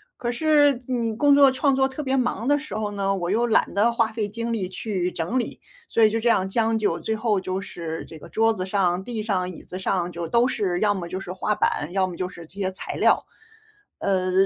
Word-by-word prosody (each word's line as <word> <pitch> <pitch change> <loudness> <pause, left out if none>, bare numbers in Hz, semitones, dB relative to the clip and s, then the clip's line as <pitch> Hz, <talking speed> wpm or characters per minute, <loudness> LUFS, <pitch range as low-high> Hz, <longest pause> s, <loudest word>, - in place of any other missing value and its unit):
可 240 -1 -3
是 290 -1 +3
你 235 -3 -1
工 285 +4 +5
作 280 -2 +7
创 270 +1 +2
作 265 0 +3
特 270 +3 -5
别 265 -1 0
忙 245 -2 -1
的 290 +1 +4
时 300 -6 -7
候 215 -1 -2
呢， 195 -1 0
我 175 -2 -3
又 235 +3 +2
懒 225 - +2
得 210 +4 +3
花 230 -1 +2
费 220 -2 -3
精 230 +2 -3
力 195 -5 -2
去 185 -2 -2
整 175 +10 -1
理。 240 - -4 0.3
所 230 - +1
以 215 - +7
就 225 - 0
这 235 - +2
样 190 -4 +2
将 225 +2 +1
就， 210 - 0
最 220 - -2
后 215 -4 +1
就 185 0 -3
是 165 -4 -6
这 160 - -10
个 - - -12
桌 225 0 +2
子 185 -4 -3
上、 185 -2 +1
地 230 0 -4
上、 185 -4 -1
椅 180 - -10
子 180 - -7
上 180 -2 -1
就 170 0 -4
都 235 +1 +4
是 185 -8 -1
要 205 -1 +3
么 175 -3 -5
就 185 - -4
是 180 -1 -6
画 205 +3 -1
板， 150 - 0
要 190 -1 +2
么 180 - -7
就 185 +1 -3
是 170 -3 -11
这 190 +5 -14
些 190 -1 0
材 185 - -6
料。 - - +3 0.7
呃， 185 -1 0
210 Hz, 265 characters per minute, -24 LUFS, 185-235 Hz, 0.7 s, 作